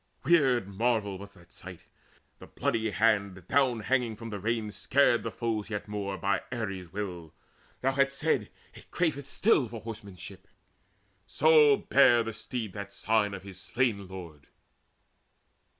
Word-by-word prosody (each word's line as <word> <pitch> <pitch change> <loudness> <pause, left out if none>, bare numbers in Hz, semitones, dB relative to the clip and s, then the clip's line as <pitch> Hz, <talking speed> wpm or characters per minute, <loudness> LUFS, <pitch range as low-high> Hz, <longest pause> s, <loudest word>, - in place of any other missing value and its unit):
Weird 135 - +3
marvel 100 -1 -1
was 100 +1 -11
that 85 0 -19
sight, 90 -2 -10 0.6
The - - -12
bloody 115 -5 -1
hand 100 -4 +1
down 130 -5 +2
hanging 120 -1 0
from 115 +1 -8
the 100 - -4
rein, 110 +1 -1
Scaring 120 +3 +2
the 115 - -3
foes 115 -2 -3
yet 105 -1 -4
more, 100 -1 -4
by 100 +1 0
Ares' 95 -8 -4
will. 90 -5 -6 0.5
Thou 135 - +2
hadst 140 0 +1
said, 140 -9 0 0.2
"It - - -15
craveth 145 -5 -1
still 170 - +3
for 115 -1 -7
horsemanship!" 105 -5 -9 0.8
So 150 -2 +5
bare 120 -4 +4
the 115 0 -5
steed 110 -2 -5
that 100 -1 -7
sign 105 -2 +1
of 95 - -9
his 95 -2 -10
slain 110 -4 -1
lord. 85 -6 -10
110 Hz, 150 wpm, -29 LUFS, 100-125 Hz, 0.8 s, So